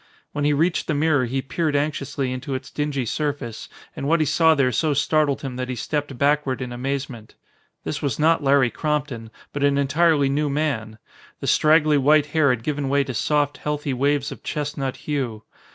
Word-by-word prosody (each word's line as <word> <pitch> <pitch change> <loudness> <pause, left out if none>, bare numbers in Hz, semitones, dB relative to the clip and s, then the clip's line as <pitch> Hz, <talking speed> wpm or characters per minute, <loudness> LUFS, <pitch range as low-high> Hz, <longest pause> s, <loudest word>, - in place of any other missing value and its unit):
When 145 -1 -2
he 150 - +3
reached 165 +4 +1
the 155 - 0
mirror 145 -3 +2
he 130 +2 -2
peered 150 +2 -1
anxiously 140 -2 -1
into 130 +1 -4
its 130 0 -7
dingy 145 -3 -2
surface 140 -3 -3 0.3
and 140 - -4
what 165 +2 +3
he 155 - +2
saw 160 +2 +4
there 135 -3 +2
so 150 +3 +1
startled 145 0 +1
him 130 -2 -5
that 125 0 -4
he 125 - -2
stepped 145 +2 -3
backward 140 -2 +1
in 125 -2 -5
amazement. 130 -2 -5 0.5
This 145 - -4
was 140 -6 -1
not 160 0 +3
Larry 135 -3 +4
Crompton, 145 -7 -2 0.2
but 145 - -2
an 140 0 +3
entirely 145 +1 +3
new 145 +2 0
man. 135 -7 -2 0.4
The - - -6
straggly 155 -1 +4
white 150 +2 +4
hair 155 -3 +4
had 125 -3 0
given 145 -1 -2
way 140 +1 +3
to 130 -1 -5
soft, 145 +2 0
healthy 150 -2 -3
waves 140 +2 0
of - - -9
chestnut 140 -3 -3
hue. 125 -7 -2
145 Hz, 190 wpm, -23 LUFS, 130-150 Hz, 0.5 s, saw